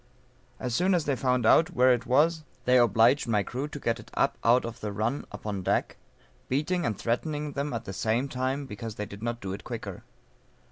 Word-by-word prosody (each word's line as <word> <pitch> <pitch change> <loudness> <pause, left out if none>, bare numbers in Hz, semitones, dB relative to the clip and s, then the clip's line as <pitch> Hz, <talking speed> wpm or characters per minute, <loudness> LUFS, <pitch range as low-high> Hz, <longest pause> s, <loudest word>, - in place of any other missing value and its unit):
As 125 -2 -3
soon 180 +7 +3
as 165 -3 0
they 140 - +1
found 125 -2 +1
out 160 +8 +6
where 125 +1 +6
it 120 0 -3
was 155 +5 +3 0.2
they 125 0 +5
obliged 120 +4 +4
my 105 -3 +2
crew 130 +8 -4
to 150 - -8
get 115 -3 -1
it - - -13
up - - +2
out 120 +2 +4
of 115 +1 -6
the 105 -2 -4
run 110 +7 -2
upon 105 -1 -4
deck, - - 0 0.5
beating 155 +6 0
and 105 -4 -2
threatening 145 +7 -2
them 140 +1 -3
at 115 -3 -4
the 95 - -6
same 115 +7 0
time 130 +2 -2
because 110 -1 -7
they 105 - -4
did 100 +1 -10
not 120 +1 -3
do 95 -1 -4
it 100 -1 -7
quicker. - - -6
125 Hz, 215 wpm, -28 LUFS, 110-140 Hz, 0.5 s, out